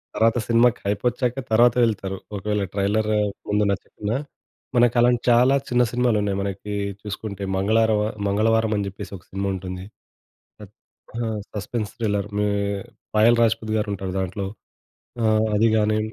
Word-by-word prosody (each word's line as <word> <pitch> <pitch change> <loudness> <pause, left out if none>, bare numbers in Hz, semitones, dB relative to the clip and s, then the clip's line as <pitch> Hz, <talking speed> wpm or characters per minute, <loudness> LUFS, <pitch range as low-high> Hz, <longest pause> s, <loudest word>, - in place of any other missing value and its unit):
తర్వాత 115 +1 +3
సినిమాకి 120 +1 +4
హైపొచ్చాక 125 +5 0
తర్వాత 120 +2 +5
వెళ్తారు. 95 -4 -1 0.2
ఒకవేళ 105 +1 -1
ట్రైలర్ 105 +2 +1 0.4
ముందు 105 0 +2
నచ్చకున్నా, 105 +3 -3 0.6
మనకు 120 -1 +4
అలాంటి 120 0 +4
చాలా 125 +3 +5
చిన్న 125 0 +3
సినిమాలు 125 -2 +2
ఉన్నాయి. 100 -1 -1
మనకి 100 +1 -4 0.3
చూసుకుంటే 100 -1 -6
మంగళారమ, 110 +2 +2 0.3
మంగళవారం 110 +2 +2
అని 100 - -1
జేప్పేసి 100 0 -8
ఒక 85 - -20
సినిమా 100 +1 -2
ఉంటుంది. 95 0 -6 0.8
ఆహ్, - - -12 0.6
ఆ! - - -1 0.2
Suspense 105 0 -3
thriller. 105 -3 -1
మే 105 - +2 0.7
'పాయల్ 115 +2 +5
రాజపుత్' 110 -1 +1
గారుంటారు 100 -3 -3
దాంట్లో. 95 +1 -3 0.8
ఆ! - - +1 0.3
అది 115 +2 +4
గాని 110 0 +2
105 Hz, 135 wpm, -23 LUFS, 100-115 Hz, 0.8 s, తర్వాత